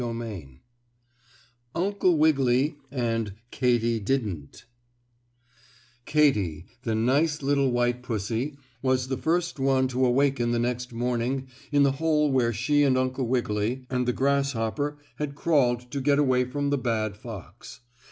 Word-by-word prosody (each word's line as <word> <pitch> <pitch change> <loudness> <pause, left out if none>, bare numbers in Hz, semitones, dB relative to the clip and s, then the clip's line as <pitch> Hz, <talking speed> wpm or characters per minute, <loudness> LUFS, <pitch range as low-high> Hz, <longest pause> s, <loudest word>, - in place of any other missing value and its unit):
STORY 115 -1 -3
XVI 90 - -7 1.2
UNCLE 185 -1 +2
WIGGILY 140 -2 +3
AND 115 -5 -1 0.2
KATY 120 -2 +1
DIDN'T 100 - -3 1.4
Katy, 105 - +2 0.2
the 115 -3 -1
nice 140 +7 +1
little 140 -1 +2
white 120 0 0
pussy, 115 +5 -3 0.2
was 130 -1 +1
the 130 - -1
first 170 -1 -1
one 135 -1 +2
to 130 +1 0
awaken 130 -1 +2
the - - +1
next 125 +1 -2
morning 125 +2 -1 0.2
in 145 -1 +4
the 140 - +4
hole 150 -2 +2
where 125 -3 +2
she 120 +7 +1
and 135 -3 +3
Uncle 130 0 -1
Wiggily 120 0 -1
and 125 -1 0
the - - +3
grasshopper 140 +1 0 0.2
had 145 -1 -4
crawled 135 -7 +2
to 140 - -2
get 140 +1 +3
away 130 -3 +3
from 140 +3 -2
the 145 - +1
bad 110 -4 -1
fox. 105 -1 -10
130 Hz, 140 wpm, -26 LUFS, 115-140 Hz, 1.4 s, in